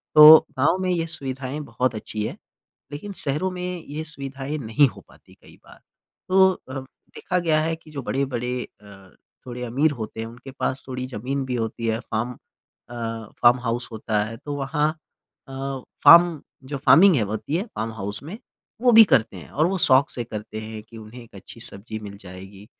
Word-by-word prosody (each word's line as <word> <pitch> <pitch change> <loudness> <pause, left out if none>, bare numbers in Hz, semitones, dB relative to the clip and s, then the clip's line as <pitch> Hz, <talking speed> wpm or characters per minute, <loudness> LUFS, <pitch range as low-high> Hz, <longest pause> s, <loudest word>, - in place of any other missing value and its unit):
तो 155 +1 +12 0.2
गाँव 145 +7 +3
में 185 - -1
ये 170 -2 0
सुविधाएँ 135 -2 -5
बहुत 125 -2 -2
अच्छी 105 0 -4
है - - -7 0.6
लेकिन 155 +8 -7
शहरों 150 +2 -1
में 180 -1 -5
ये 150 +2 -5
सुविधाएँ 140 -1 -6
नहीं 120 +4 +3
हो - - -12
पाती - - -20
कई - - -18
बार। - - -16 0.5
तो 190 0 +6
अ, 135 -6 -8
देखा 180 +6 -5
गया 160 -3 +2
है 165 +1 -1
कि 160 -1 -18
जो 140 -2 -5
बड़े-बड़े 125 -2 -2 0.2
अ, 95 -2 -15 0.4
थोड़े 125 -1 -6
अमीर 135 +6 +1
होते 110 0 -6
हैं 115 - -3
उनके 120 +4 -11
पास 130 0 -3
थोड़ी 130 0 -4
ज़मीन 130 +3 -3
भी 130 -1 -3
होती 115 0 -3
है 110 +1 0
फार्म 115 +1 -3
अ, 120 0 -19 0.5
फार्म 120 +1 +6
हाउस 120 0 -2
होता 110 -1 -1
है 115 +1 -8
तो 145 +3 -6
वहाँ 150 +2 0 0.6
अ, - - -11 0.5
फार्म 170 -3 +8 0.3
जो 140 0 -4
फार्मिंग 185 +1 +7
है 125 - +2
होती 110 +8 -3
है 190 - -1
फार्म 110 +1 -3
हाउस 105 +2 -6
में 180 +9 -7 0.4
वो 245 0 +5
भी 225 -1 +10
करते 110 - +2
हैं - - -11
और 155 +3 +2
वो 190 +1 -1
शौक 130 +2 +5
से 120 - -5
करते 110 -1 -7
हैं 110 0 -7
कि 115 +1 -14
उन्हें 110 +3 -11
एक 110 -3 -19
अच्छी 100 +4 -12
सब्जी 110 -1 -5
मिल 100 -1 -9
जाएगी 95 +2 -11
130 Hz, 190 wpm, -23 LUFS, 110-150 Hz, 0.6 s, तो